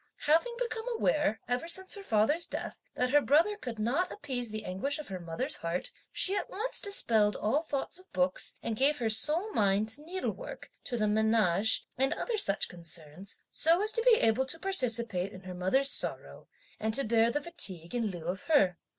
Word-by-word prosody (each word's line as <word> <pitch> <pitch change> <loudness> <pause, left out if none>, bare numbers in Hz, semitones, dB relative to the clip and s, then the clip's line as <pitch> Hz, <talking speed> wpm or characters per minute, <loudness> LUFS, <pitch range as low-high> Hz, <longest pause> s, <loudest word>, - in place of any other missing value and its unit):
Having 335 +11 +1
become 470 -1 -4
aware, 295 - 0
ever 245 +6 -2
since 375 +2 +2
her 405 - -6
father's 295 - +2
death, - - -6
that 250 0 -1
her 290 +1 +5
brother 325 +10 +2
could 245 - -7
not 260 +12 -1
appease 250 - -4
the 215 0 -6
anguish 195 - -2
of 305 - -8
her 190 -1 -6
mother's 165 -1 -3
heart, 170 +2 -3 0.2
she 385 - +1
at - - -3
once 450 +5 0
dispelled 225 - +4
all 230 +9 0
thoughts 305 +2 -4
of 370 - -17
books, 180 0 0
and 225 - -3
gave 280 +6 +2
her 230 -4 -1
sole 315 - +1
mind 205 +1 +1
to 250 +7 +1
needlework, 370 +9 -6
to 245 - -3
the 215 -1 0
menage 220 -2 +2
and 270 +1 +2
other 470 -3 -3
such 195 - +4
concerns, 170 +1 -6
so 330 +2 +4
as 430 - +4
to 460 - +1
be 480 0 +5
able 225 +4 +2
to 300 - +1
participate 235 - +1
in 185 - -11
her 185 -1 -9
mother's 190 +11 +2
sorrow, - - -1 0.3
and 220 0 -1
to 275 - +1
bear 225 0 +2
the 290 - -1
fatigue 190 - -3
in 235 -2 -1
lieu 175 -5 -7
of 180 +3 -4
her. 195 - +2
240 Hz, 195 wpm, -30 LUFS, 205-325 Hz, 0.3 s, her